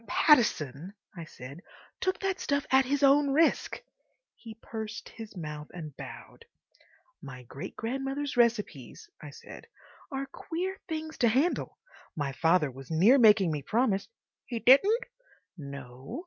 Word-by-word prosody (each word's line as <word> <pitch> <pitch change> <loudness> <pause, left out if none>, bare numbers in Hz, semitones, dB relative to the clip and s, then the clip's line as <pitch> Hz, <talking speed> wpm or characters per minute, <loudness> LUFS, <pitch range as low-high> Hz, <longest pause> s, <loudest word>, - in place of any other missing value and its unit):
"Pattison," 190 - +2 0.2
I 170 -2 -7
said, 140 +2 -11 0.4
"took 375 0 0
that 385 -1 -1
stuff 285 -1 -1
at 265 0 +5
his 285 +2 0
own 280 +1 +5
risk." 315 +4 +1 0.5
He 225 -2 -11
pursed 225 0 -7
his 220 -4 -10
mouth 150 -2 -6
and 155 -5 -8
bowed. 465 - -11 0.8
"My 125 -3 -10
great 140 +9 -9
grandmother's 270 +4 -3
recipes," 220 - 0
I 150 - -8
said, 145 - -12 0.4
"are 270 0 -3
queer 365 +7 -5
things 315 -1 -5
to 240 - +4
handle. 270 +10 0 0.4
My 145 -3 -2
father 160 0 +2
was 135 +1 -12
near 195 - +5
making 210 -6 +6
me 150 -2 -3
promise—" 215 - 0 0.4
"He 240 - -4
didn't?" 395 - +5 0.5
"No. 140 - -8
225 Hz, 135 wpm, -29 LUFS, -, 0.8 s, making